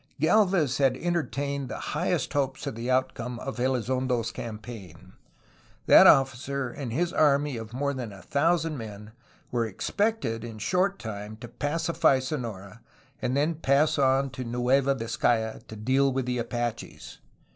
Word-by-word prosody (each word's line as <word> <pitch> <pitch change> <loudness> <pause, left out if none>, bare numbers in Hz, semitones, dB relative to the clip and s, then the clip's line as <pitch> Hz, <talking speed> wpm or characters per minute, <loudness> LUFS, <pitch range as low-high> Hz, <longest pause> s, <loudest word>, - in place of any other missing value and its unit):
Gdlvez 175 - +3
had 135 -2 +3
entertained 140 -6 -2
the - - -5 0.2
highest - - -1
hopes 135 0 -1
of 140 - -3
the 115 +3 -5
outcome 125 -2 -1
of 135 +2 -6
Elizondo^s 125 -1 0
campaign. 105 -6 -9 0.7
That - - +8
officer 135 0 +3
and 130 -3 -6
his 170 +8 -1
army 145 -2 +3
of 115 -1 -7
more 140 +3 -1
than 125 -5 -5
a 95 -3 -12
thousand 160 - +1
men 105 -1 -9 0.4
were 120 -2 0
expected 125 - -1
in 115 -2 -7
a - - -11
short 190 - +1
time 105 -1 -7
to 120 +2 -9
pacify 145 0 +1
Sonora 115 -7 -5 0.4
and 130 +2 0
then 150 +4 +2
to 155 - -14
pass 150 +2 +2
on 135 0 +2
to 130 0 -6
Nueva 125 +3 +2
Vizcaya 115 -2 0
to 110 - -9
deal 130 +5 +2
with 130 -1 -1
the 125 -1 -1
Apaches. 120 -1 -4
130 Hz, 155 wpm, -27 LUFS, 115-140 Hz, 0.7 s, That